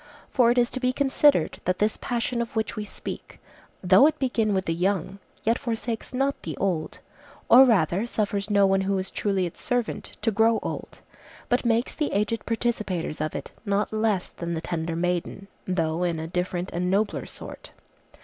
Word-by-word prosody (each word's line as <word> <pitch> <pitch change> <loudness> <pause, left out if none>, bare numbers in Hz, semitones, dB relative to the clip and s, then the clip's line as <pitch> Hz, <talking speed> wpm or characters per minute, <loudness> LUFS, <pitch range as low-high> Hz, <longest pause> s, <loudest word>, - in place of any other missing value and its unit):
For 245 -3 +4
it 240 - +2
is 240 -1 +3
to 260 - -3
be 250 0 +1
considered 280 - +3
that 180 0 +1
this 210 +1 +1
passion 240 0 -2
of 235 - -5
which 220 0 -1
we 215 -1 -4
speak, - - -8 0.4
though 190 +9 +7
it 310 -1 0
begin 245 -6 0
with 190 -1 0
the 165 - 0
young, 190 +2 -1 0.2
yet 230 +2 +2
forsakes 230 -1 -3
not 270 +2 0
the 155 -4 -6
old, 170 -4 -1 0.5
or 260 +3 +9
rather 195 -2 +2
suffers 205 -3 -1
no 200 -1 +5
one 195 0 +3
who 195 0 0
is 190 0 -3
truly 195 -3 0
its 170 - -7
servant 245 -3 -2
to 225 - +3
grow 225 +2 +3
old, - - -6 0.5
but 245 +1 +1
makes 235 +1 +1
the 300 -2 -2
aged 210 +1 -1
participators 215 -9 -2
of 155 0 -2
it - - -6
not 205 0 0
less 215 -4 0
than 170 0 -5
the - - -2
tender 165 -1 -3
maiden, 180 +3 -2 0.2
though 165 -2 0
in 170 -2 0
a 160 - -4
different 180 +1 -2
and 180 +1 -1
nobler 200 +3 0
sort. - - -10
205 Hz, 190 wpm, -25 LUFS, 180-235 Hz, 0.5 s, or